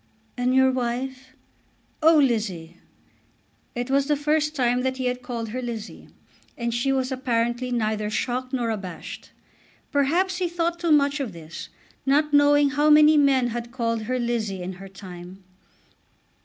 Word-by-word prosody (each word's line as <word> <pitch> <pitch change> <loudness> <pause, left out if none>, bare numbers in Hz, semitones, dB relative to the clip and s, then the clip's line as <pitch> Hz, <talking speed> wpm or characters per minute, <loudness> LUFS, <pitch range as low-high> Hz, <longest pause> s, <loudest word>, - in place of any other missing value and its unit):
"And 250 +1 +1
your 265 0 +5
wife?" 255 +1 -4 0.7
"Oh, 320 +1 +6
Lizzie!" 205 - 0 1.0
It 245 +2 -3
was 275 0 +2
the 300 - +2
first 300 +1 0
time 250 -2 +1
that 260 0 -1
he 260 - -3
had 250 0 -1
called 235 -3 -5
her 255 +4 -4
Lizzie, 230 -3 -7 0.5
and 235 -1 -2
she 240 +3 0
was 260 0 0
apparently 245 -1 -1
neither 215 -3 -1
shocked 255 +3 -2
nor 240 -4 -1
abashed. 190 -5 -7 0.6
Perhaps 340 +7 +1
he 360 -1 -1
thought 340 0 -1
too 340 -2 0
much 285 0 +3
of 250 -8 -4
this, 165 0 -9 0.3
not 295 +2 +2
knowing 290 0 +5
how 295 +2 +2
many 300 +1 +7
men 270 -4 +3
had 240 0 -5
called 230 -2 -1
her 255 - +1
Lizzie 225 -6 -2
in 185 +1 -5
her 195 - -9
time. 185 0 -11
255 Hz, 155 wpm, -24 LUFS, 230-285 Hz, 1.0 s, many